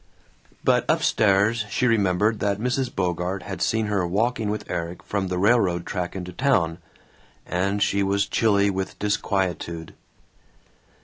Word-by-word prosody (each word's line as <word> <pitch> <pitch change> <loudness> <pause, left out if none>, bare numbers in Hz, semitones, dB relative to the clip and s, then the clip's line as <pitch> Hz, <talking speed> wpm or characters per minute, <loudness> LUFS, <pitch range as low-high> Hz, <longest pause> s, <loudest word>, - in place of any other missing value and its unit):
But - - +2
up - - +2
stairs 105 +2 +3
she 115 +6 0
remembered 105 -1 +2
that 100 -1 0
Mrs. 125 +3 -1
Bogart 90 0 -2
had 95 - -6
seen 110 -1 +1
her 105 -3 0
walking 110 +4 0
with 105 +1 -4
Erik 85 0 -4
from 100 -2 -2
the 90 0 -2
railroad 95 -4 +2
track 90 -1 -4
into 90 -1 -6
town, 90 -9 +1 0.7
and 100 +3 0
she 100 - +1
was 100 +1 +1
chilly 100 -3 +2
with 95 0 -4
disquietude. 95 -5 -2
100 Hz, 140 wpm, -24 LUFS, 90-105 Hz, 0.7 s, stairs